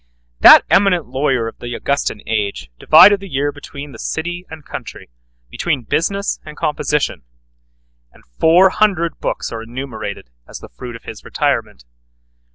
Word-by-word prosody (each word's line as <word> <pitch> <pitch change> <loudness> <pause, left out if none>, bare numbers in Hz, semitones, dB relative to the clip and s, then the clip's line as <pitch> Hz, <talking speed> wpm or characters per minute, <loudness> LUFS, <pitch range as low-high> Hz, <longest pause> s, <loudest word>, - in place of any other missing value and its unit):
That - - +9
eminent 185 -4 +3
lawyer 130 -2 -1
of 115 - -9
the 120 0 -6
Augustan 140 0 -2
age 105 - -3
divided 195 +6 +7
the 195 0 -10
year 145 0 -1
between 145 0 -10
the 115 - -12
city 175 +3 -4
and 155 -2 -11
country, - - -9 0.4
between 150 -8 -2
business 200 - -1
and 150 -1 -11
composition; 150 -1 -1 0.9
and - - -22 0.2
four 175 +4 +6
hundred 185 -6 0
books - - -3
are 115 - -5
enumerated 115 - -7 0.2
as - - -9
the - - -12
fruit 120 - -9
of 115 - -12
his 110 - -10
retirement. - - -2
145 Hz, 150 wpm, -18 LUFS, 120-175 Hz, 0.9 s, That